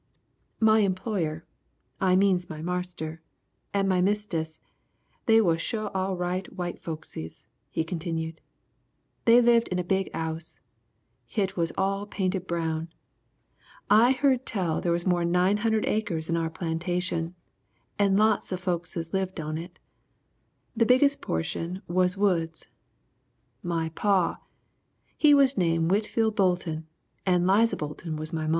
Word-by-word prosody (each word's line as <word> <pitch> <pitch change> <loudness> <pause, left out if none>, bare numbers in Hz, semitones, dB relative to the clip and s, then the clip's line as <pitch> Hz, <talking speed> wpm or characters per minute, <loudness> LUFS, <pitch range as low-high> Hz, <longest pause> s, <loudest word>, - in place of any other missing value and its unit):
"My 220 0 +5
employer, 185 -5 -1 0.5
I 185 -1 +3
means 185 -2 +2
my 155 - -6
marster, 175 -3 -4 0.5
and 200 -1 +1
my 185 -1 +2
mistess, 180 -5 -1 0.7
they 225 -1 +6
was 165 -5 +2
sho' 215 +3 -2
all 190 0 -2
right 180 +2 -2
white 175 -2 -5
folkses," 155 - -7 0.2
he 160 - -1
continued. 160 -1 -4 0.8
"They 235 +1 +7
lived 235 -1 +4
in 180 - -2
the 180 - 0
big 190 +2 0
'ouse. 160 0 -5 0.7
Hit 195 -2 -1
was 165 -2 0
all 195 +1 0
painted 190 -2 -2
brown. 165 -1 -2 1.0
I 230 +5 +7
heard 265 -1 +1
tell 180 -7 -1
they 175 - -1
was 170 0 0
more'n 175 -2 +1
900 210 +5 +2
acres 185 -8 -1
in 165 - +1
our 165 -1 0
plantation 170 +1 -2 0.6
and 200 -1 +4
lots 215 -1 +2
of 185 - -2
folkses 170 -2 -3
lived 190 -2 -1
on 155 0 -3
it. 170 +2 -7 1.0
The 230 - +3
biggest 280 +3 +4
portion 170 - -3
was 180 +2 +1
woods. 170 -5 0 1.0
My 165 -2 -1
paw, 190 +1 +1 0.8
he 295 -2 +6
was 275 -3 +4
name 165 -2 +2
Whitfield 220 +2 +1
Bolton 175 -5 0 0.4
and 180 -2 +2
Liza 210 +5 +3
Bolton 155 +2 -5
was 155 +2 -6
my 160 -1 -2
maw. - - 0
180 Hz, 135 wpm, -27 LUFS, 165-200 Hz, 1.0 s, They